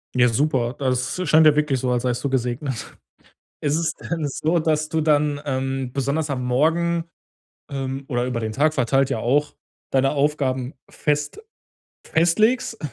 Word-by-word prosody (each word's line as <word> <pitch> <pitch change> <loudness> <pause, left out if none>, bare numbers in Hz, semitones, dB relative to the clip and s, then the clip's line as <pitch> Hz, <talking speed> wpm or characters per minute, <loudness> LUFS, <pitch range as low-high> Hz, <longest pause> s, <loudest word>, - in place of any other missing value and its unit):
Ja, 125 -1 +5
super, 130 -1 0
das 130 +6 -1
scheint 155 +1 +6
ja 150 - +5
wirklich 150 -3 +1
so, 125 - -1
als 120 -1 0
seist 125 +1 -1
du 140 - 0
gesegnet. 125 0 -3 0.6
Ist 145 0 0
es 160 -1 0
denn 165 -4 -4
so, 160 +4 0
dass 155 -1 0
du 160 0 -1
dann, 150 -1 +2
ähm, 135 -2 -2
besonders 140 +3 -1
am 130 -2 -2
Morgen 165 +6 +1 0.6
ähm, 135 -1 -4
oder 120 -1 -1
über 125 -2 -2
den 110 -1 -3
Tag 150 +5 +2
verteilt 135 +1 +1
ja - - -1
auch 145 +5 +1 0.4
deine 135 0 +3
Aufgaben 140 -3 0 0.2
fest 150 0 -2 0.6
festlegst? 215 +8 +2
140 Hz, 160 wpm, -22 LUFS, 130-155 Hz, 0.6 s, scheint